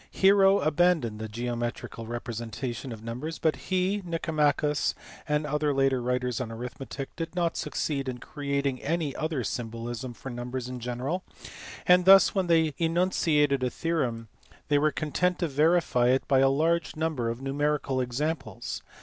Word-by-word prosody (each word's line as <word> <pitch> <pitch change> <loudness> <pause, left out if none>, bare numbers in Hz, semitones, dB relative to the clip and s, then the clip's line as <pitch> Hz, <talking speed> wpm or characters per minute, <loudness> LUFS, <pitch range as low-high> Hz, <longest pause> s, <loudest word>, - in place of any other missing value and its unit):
Hero 195 0 +5
abandoned 155 -8 +2
the 110 - -4
geo 120 +3 -3
metrical 120 -1 -5
representation 120 +2 -5
of 110 -1 -8
numbers 125 +8 -5
but 160 -1 +1
he, 190 +2 -1
Nicomachus, 150 -3 +1 0.3
and 150 0 +1
other 150 0 0
later 135 -2 +2
writers 125 0 -1
on 115 -3 -4
arithmetic 130 +4 -7
did 165 +1 -5
not 170 -2 0
succeed 140 -3 -2
in 125 - -4
creating 140 0 -2
any 155 -2 -1
other 155 -5 -2
symbolism 120 +1 -4
for 135 - -8
numbers 125 +1 -4
in 125 0 -6
general, 125 +9 -3 0.6
and 180 0 +5
thus 195 0 +8
when 190 -3 0
they 160 -3 +3
enunciated 165 -5 +2
a 125 - +1
theorem 125 -7 -2 0.4
they 145 -1 +4
were 155 +1 +3
content 180 +4 0
to 170 - 0
verify 150 -4 +3
it 130 +1 +2
by 135 -2 +4
a 135 0 +5
large 160 +4 +1
number 155 -7 -1
of 115 +1 -4
numerical 140 -1 0
examples. 130 -2 -3
140 Hz, 155 wpm, -28 LUFS, 125-165 Hz, 0.6 s, thus